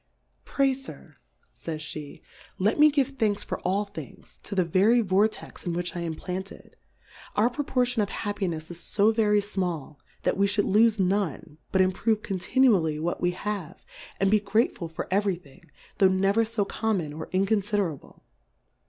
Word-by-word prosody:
Pray 275 -1 +2
Sir, 270 +1 -11 0.4
faysjhe^ 155 -2 -7 0.3
let 205 +9 +1
me 305 0 +8
give 280 -3 +1
Thanks 210 -2 +1
for - - -4
all 195 +3 0
Things, 165 -9 -11
to 200 - -6
the 185 -2 +3
very 200 +8 +4
Vortex 205 +1 0
in 175 - -2
which 175 +1 -3
I - - -3
am 165 -2 -3
planted: 185 +4 -7 0.6
Our 225 +4 +3
Proportion 250 -4 0
of 200 - -1
Happinefs 180 -6 -3
is 170 0 -8
fo 210 +2 +5
very 210 -2 +3
fmall, 180 -8 -3 0.3
that - - +1
v^e 200 - +4
Ihould 205 - +1
lofe 220 -1 +5
none, 185 -5 -1
but 190 - +3
improve 210 +4 +1
conti 195 +6 -3
nually 175 -12 +4
what 170 +2 -2
we 175 - +3
have, 195 -3 -5 0.3
and 195 0 +3
be 215 - +5
grateful 205 -3 0
for 160 - -6
every 200 -1 +2
Thing, 145 -7 -18 0.3
tho' 195 - +7
never 195 +4 +2
fo 220 -2 -1
common 195 -9 -1
or 160 - -6
inconiiderable. 195 -4 -1
195 Hz, 160 wpm, -26 LUFS, 175-215 Hz, 0.6 s, me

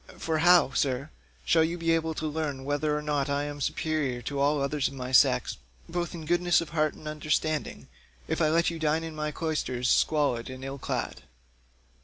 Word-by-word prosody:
For 160 -1 -1
how, 175 -3 +6
sir, 135 +2 -1 0.3
shall 160 - +4
you 165 +2 -1
be 165 -1 0
able 160 -1 0
to 155 - -4
learn 150 -3 -3
whether 150 +1 0
or 150 - -4
no 150 -1 -1
I 140 0 0
am 145 0 -6
superior 140 -4 -1
to 140 +2 -3
others 145 0 +1
of 135 - -8
my 130 -1 -5
sex 130 - +4 0.3
both 175 0 -3
in 160 -2 -7
goodness 175 +1 +3
of 165 - -5
heart 155 -1 0
and 155 - -11
understanding, 155 0 -2 0.4
if - - -1
I 155 - +4
let 170 +2 +2
you 165 - -6
dine 160 +1 +1
in 165 -1 -6
my 150 0 -2
cloisters 150 -5 -1
squalid 140 -7 +2
and 130 0 -8
ill 135 +1 -6
clad? - - -3
150 Hz, 195 wpm, -28 LUFS, 140-160 Hz, 0.4 s, how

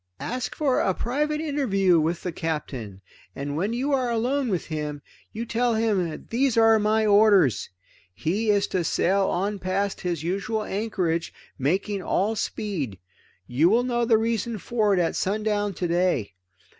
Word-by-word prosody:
Ask 250 +1 -4
for 280 -4 +1
a 190 - +1
private 300 +5 -1
interview 200 - +2
with 165 +2 -1
the 180 - -2
Captain, 135 - -4 0.3
and 145 +1 -4
when 190 +8 -1
you 260 +5 -1
are 255 -3 +1
alone 250 +3 0
with 185 -5 -1
him, 150 -2 -4 0.4
tell 235 +1 +1
him 210 -6 +1
that 155 - -10
these 250 0 +1
are 225 -1 +6
my 215 +1 +2
orders: 200 - +4 0.4
He 195 - -1
is 205 -1 +3
to 185 -2 0
sail 195 +4 +2
on 200 +3 -1
past 190 +2 -2
his 170 -4 -2
usual 200 +5 -2
anchorage, 190 -6 -2 0.3
making 190 +8 0
all 205 +4 0
speed. 165 - -3 0.5
You 135 - +3
will 235 +4 +3
know 240 -1 0
the 230 -1 +4
reason 225 0 -1
for 215 +1 0
it - - +1
at 170 -2 0
sundown 205 0 -1
today. 175 - 0
200 Hz, 155 wpm, -25 LUFS, 170-225 Hz, 0.5 s, are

